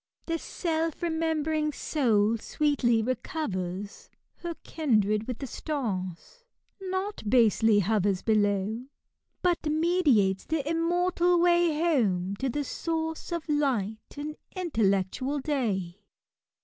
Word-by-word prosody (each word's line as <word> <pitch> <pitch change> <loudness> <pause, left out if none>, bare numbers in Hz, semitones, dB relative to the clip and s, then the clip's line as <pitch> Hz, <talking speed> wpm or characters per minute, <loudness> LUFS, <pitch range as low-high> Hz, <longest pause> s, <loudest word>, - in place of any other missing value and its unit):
The 330 0 -1
self 330 -1 -2
remembering 320 -2 0
soul 225 -8 +1
sweetly 245 -5 +1
recovers 200 - -4 0.3
Her 345 -1 -5
kindred 215 -8 +1
with 250 -3 -3
the 275 - -5
stars: 240 - -4 0.4
not 380 +2 -3
basely 225 -2 +4
hovers 200 -1 +1
Below— 210 +1 +1 0.6
but 355 -2 +2
meditatea 300 - +2
the 310 -3 -1
immortal 350 +2 +2
way 345 -2 +3
Home 200 - +1
to 265 +3 -1
the 290 +4 -1
source 320 +3 -3
of 340 -1 -3
light 255 -8 -1
and 300 +1 -4 0.2
faiteltectaal 255 - 0
day." 205 - -1
280 Hz, 105 wpm, -28 LUFS, 210-325 Hz, 0.6 s, basely